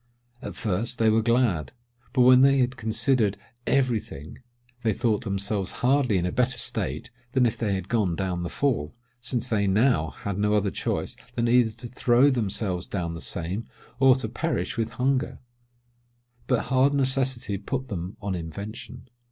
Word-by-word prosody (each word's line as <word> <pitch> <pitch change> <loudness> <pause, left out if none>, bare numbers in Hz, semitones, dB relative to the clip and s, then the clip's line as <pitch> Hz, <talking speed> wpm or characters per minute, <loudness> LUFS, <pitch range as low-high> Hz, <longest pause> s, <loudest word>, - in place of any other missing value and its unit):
At - - -7
first, 110 +3 -2
they 110 -1 +3
were 110 +1 +3
glad; 115 - +1 0.4
but 130 0 +2
when 125 +1 +7
they 135 0 +5
had 125 0 +1
considered 110 -2 +1 0.3
every 130 -5 +2
thing, 75 -5 -11 0.4
they 110 -2 +1
thought 110 -1 0
themselves 100 0 -2 0.2
hardly 130 -6 +3
in 90 - 0
a 90 - -1
better 125 +2 0
state 75 - -2 0.2
than 130 -2 +4
if 115 - +1
they 105 -4 -1
had 95 -1 -4
gone 100 -7 +1
down 90 -2 -2
the 85 - -3
Fall, 120 - -1 0.2
since 120 0 -2
they 110 -4 +1
had 100 - +1
now 105 - +2 0.2
no 105 +1 +2
other 100 -2 +1
choice - - -3 0.2
than 120 0 +1
either 120 -2 +4
to 120 +2 -9
throw 125 +3 +3
themselves 100 -6 -1
down 85 -4 -3
the 85 - -7
same, 90 +7 -2 0.3
or 135 -1 +6
to 130 -4 -3
perish 165 +9 -2
with 115 -2 -1
hunger: 130 +2 0 1.1
but 125 -3 +2
hard 135 +2 +4
necessity 130 -6 +1
put 130 +6 -4
them 90 -2 -5
on 100 -1 -2
invention. 100 +8 -7
115 Hz, 170 wpm, -26 LUFS, 100-125 Hz, 1.1 s, when